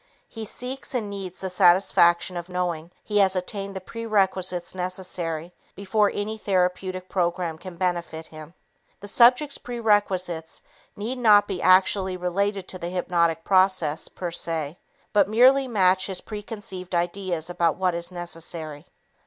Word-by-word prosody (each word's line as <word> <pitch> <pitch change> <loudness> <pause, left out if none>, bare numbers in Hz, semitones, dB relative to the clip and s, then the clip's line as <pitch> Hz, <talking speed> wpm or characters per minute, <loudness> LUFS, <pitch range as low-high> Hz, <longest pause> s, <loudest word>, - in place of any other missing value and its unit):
He 225 -2 -7
seeks 255 +4 -6
and 215 -4 -2
needs 190 -3 -7
the 190 - -3
satisfaction 175 0 +4
of 175 +1 -6
knowing 175 -3 -2
he 210 -1 0
has 190 -1 +3
attained 195 +2 -3
the - - -3
prerequisites 190 -4 -1
necessary 180 -2 -4 0.2
before 200 +1 +1
any 215 +2 -3
therapeutic 185 -1 -1
program 175 -3 -1
can 185 -2 -9
benefit 170 -3 -2
him. 155 +2 -12 0.5
The 205 - -8
subject's 250 +7 +4
prerequisites 200 -8 -1 0.3
need 235 +5 -4
not 210 -3 +6
be 190 - -4
actually 185 0 +3
related 195 +2 -1
to 185 - -5
the 170 - -4
hypnotic 170 -3 0
process, 185 -5 +2
per 175 -2 -6
se, 165 -2 -3 0.3
but 200 -3 +4
merely 260 +5 +5
match 185 -5 +2
his 190 -2 -1
preconceived 205 -4 -6
ideas 175 -1 -2
about 170 -3 +1
what 185 -1 +1
is 170 +1 -4
necessary. 165 -3 -5
185 Hz, 140 wpm, -25 LUFS, 175-205 Hz, 0.5 s, not